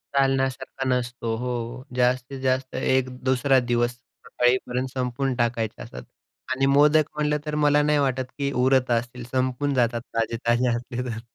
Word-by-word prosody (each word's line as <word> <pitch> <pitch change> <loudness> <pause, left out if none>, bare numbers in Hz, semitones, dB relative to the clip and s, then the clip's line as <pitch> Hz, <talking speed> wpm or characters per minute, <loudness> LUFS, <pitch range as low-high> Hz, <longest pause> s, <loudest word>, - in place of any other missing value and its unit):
चालण्यासारखा 135 -1 0
नसतो. 120 -2 -1
हो, 125 - -4
हो 125 +1 -4
जास्तीत 125 +2 0
जास्त 130 0 -1
एक 130 0 +1
दुसरा 130 0 +3
दिवस 120 0 +2
सकाळीपर्यंत 125 +1 -1
संपवून 130 +1 -1
टाकायचे 115 -2 -1
असतात 60 - -9 0.5
आणि 135 +1 +1
मोदक 150 +3 +5
म्हटलं 150 0 +1
तर 150 - -3
मला 150 -1 +4
नाही 150 0 +2
वाटत 130 -2 0
की 140 -1 -1
उरत 130 -1 +3
असतील 120 +1 -1
संपून 130 +2 0
जातात 120 -2 +1
ताजे-ताजे 120 +2 +1
असले 120 +1 -5
तर. 115 0 -6
130 Hz, 150 wpm, -24 LUFS, 120-135 Hz, 0.5 s, मोदक